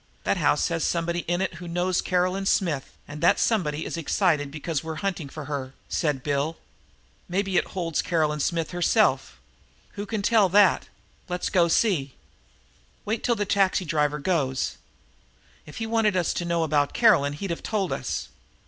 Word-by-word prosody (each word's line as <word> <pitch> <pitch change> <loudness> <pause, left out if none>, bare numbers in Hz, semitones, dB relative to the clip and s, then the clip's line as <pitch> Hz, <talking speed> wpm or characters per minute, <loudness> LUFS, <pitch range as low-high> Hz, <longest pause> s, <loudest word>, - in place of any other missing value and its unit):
"That - - +1
house - - +2
has 165 -1 -1
somebody 170 0 0
in 175 +1 +1
it 190 - -1
who 175 - -7
knows 175 +2 0
Caroline 185 +2 0
Smith, 155 -10 0
and 145 +1 -8
that - - +4
somebody 160 -9 0
is - - -4
excited 160 -3 +1
because 155 0 -3
we're 160 0 -5
hunting 175 -7 -2
for 155 0 -8
her," 135 -2 -5
said 145 -5 -1
Bill. 145 +3 -1 0.7
"Maybe 195 +1 -1
it - - +2
holds 165 -4 0
Caroline 155 -3 0 0.3
herself. 175 -1 +1 0.5
Who 205 0 -6
can 210 -1 -3
tell 210 -3 +4
that? 200 0 +4 0.4
Let's 180 0 -2
go 175 -2 +4
see." 165 - +1 0.9
"Wait 220 +2 -2
till 240 - +2
that 205 -2 -3
taxi 195 -2 +2
driver 150 -2 +1
goes. 140 -5 -1 0.9
If 150 - -10
he'd 225 - -2
wanted 225 -3 +1
us 175 - +1
to 175 - -3
know 170 -1 +1
about 145 -2 +1
Caroline 145 0 +4
he'd 180 +5 -5
of 170 - -4
told 200 -4 -1
us. - - -4
170 Hz, 165 wpm, -25 LUFS, 150-190 Hz, 0.9 s, that